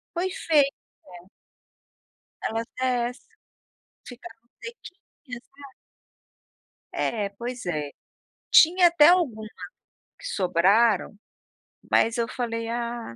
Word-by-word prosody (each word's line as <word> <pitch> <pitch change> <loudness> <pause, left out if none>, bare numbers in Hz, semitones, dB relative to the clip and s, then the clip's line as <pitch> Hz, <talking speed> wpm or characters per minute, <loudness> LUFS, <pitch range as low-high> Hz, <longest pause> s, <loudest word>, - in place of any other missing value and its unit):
Foi 360 +2 -1
fei 310 -6 +3 0.5
né. 180 0 -14 1.2
Ela 225 +1 -2
até 245 0 -2
ess 250 - -12 0.9
ficaram 235 -1 -13
sequinhas 335 - -11 0.2
lá. 280 -2 -12 1.2
É, 210 -3 -2
pois 240 +4 -7
é. 150 -4 -3 0.6
Tinha 350 +2 +6
até 335 -3 +5
alguma 255 -12 +1 0.7
que - - -12
sobraram, 200 - +2 0.7
mas 230 +1 +2
eu 230 -1 0
falei: 230 -2 -4
"Ah, 235 - -5
235 Hz, 95 wpm, -25 LUFS, 220-280 Hz, 1.2 s, Tinha